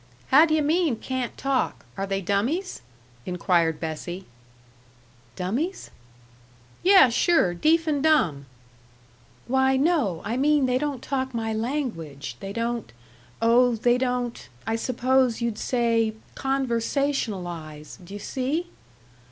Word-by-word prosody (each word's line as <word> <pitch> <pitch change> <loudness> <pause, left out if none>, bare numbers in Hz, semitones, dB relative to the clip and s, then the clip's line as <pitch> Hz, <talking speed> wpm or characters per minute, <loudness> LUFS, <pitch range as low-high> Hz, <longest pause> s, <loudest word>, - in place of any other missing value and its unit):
"How 305 +5 +7
do 310 - +2
yuh 310 - +2
mean 315 -2 +2
'can't 255 +2 -4
talk'? 275 -1 -1
Are 195 0 -3
they 195 0 -1
dummies?" 230 - -1 0.4
inquired 170 -2 +1
Bessie. 175 +3 -5 1.1
"Dummies?" 245 - -3 0.9
"Yuh, 375 -10 +7
sure, 245 - +3
deef 320 - +2
and 295 -3 0
dumb." 175 - +2 1.0
"Why, 265 +1 +2
no, 270 - +1
I 230 +3 -2
mean 290 0 +3
they 255 0 +1
don't 285 -3 -3
talk 265 -2 -2
my 225 -1 -2
language 220 - -4
they 195 - -6
don't, 230 - -3 0.5
oh, 240 +1 +4
they 240 +2 +2
don't, 250 - -2 0.2
I 225 +1 0
suppose 255 +1 +1
you'd 235 -3 -2
say 230 -3 +1 0.2
'conversationalize.' 230 - -2
Do 190 +3 -10
you - - -6
see?" 275 - -2
240 Hz, 120 wpm, -25 LUFS, 200-275 Hz, 1.1 s, How